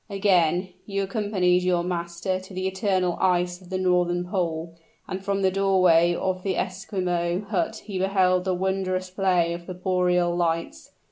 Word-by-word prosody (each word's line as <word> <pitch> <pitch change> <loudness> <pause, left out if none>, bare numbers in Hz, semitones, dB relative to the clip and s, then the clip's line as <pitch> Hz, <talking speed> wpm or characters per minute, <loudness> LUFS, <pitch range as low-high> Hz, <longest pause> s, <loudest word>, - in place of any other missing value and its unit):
Again 185 -3 +2 0.2
you 200 -1 -1
accompanied 190 -3 +1
your 180 -1 +1
master 175 +1 -2
to 190 +1 -13
the 185 0 -1
eternal 190 -2 0
ice 180 -1 +1
of 180 - -15
the 190 - -2
northern 180 -1 +1
pole, 165 -3 -2 0.3
and 190 +1 -5
from 200 0 -1
the 190 - +3
doorway 185 -3 +4
of 185 0 -2
the 190 -1 -2
Esquimaux 180 -2 -2
hut 210 +2 -1
he 195 -3 -4
beheld 185 -1 +2
the 185 -1 +1
wondrous 185 0 -1
play 180 -3 +1
of 170 0 -8
the 185 - -6
boreal 180 -1 +1
lights. 165 - -2
185 Hz, 160 wpm, -25 LUFS, 175-190 Hz, 0.3 s, doorway